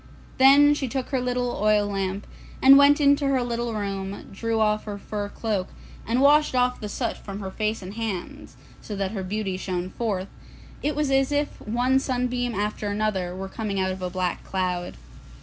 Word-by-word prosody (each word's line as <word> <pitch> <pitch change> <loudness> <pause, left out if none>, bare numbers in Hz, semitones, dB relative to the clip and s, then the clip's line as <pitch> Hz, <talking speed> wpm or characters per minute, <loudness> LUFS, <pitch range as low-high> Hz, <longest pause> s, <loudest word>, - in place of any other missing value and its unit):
Then 280 +2 +7
she 285 -2 -2
took 260 +1 -3
her 265 -3 0
little 245 0 -1
oil 210 -1 +3
lamp, 195 0 -3 0.3
and 270 +1 +8
went 280 +1 +6
into 285 0 +4
her 265 -2 +2
little 235 -1 -2
room, 195 -1 -4
drew 225 +3 -2
off 215 -1 +1
her 205 -2 -5
fur 205 0 -5
cloak, 205 -4 -2 0.4
and 240 +3 +1
washed 295 0 +5
off 250 0 +2
the 210 - -4
soot 230 +2 -2
from 200 0 -8
her 190 -2 -5
face 215 0 -2
and 185 +2 -7
hands, 215 -5 -5 0.2
so 210 - -6
that 195 -1 -2
her 205 -3 -4
beauty 190 0 -3
shone 185 -1 -3
forth, 200 -4 -2
and - - -23 0.4
it 295 0 -1
was 295 -2 0
as 270 +1 +2
if 290 0 -1
one 245 +4 +1
sunbeam 250 -2 -1
after 210 +1 -2
another 205 -4 -1
were 190 +1 -5
coming 200 0 -3
out 190 0 +1
of 185 0 -6
a 180 - -2
black 180 -1 -2
cloud. 180 -2 -2
215 Hz, 195 wpm, -25 LUFS, 195-250 Hz, 0.4 s, and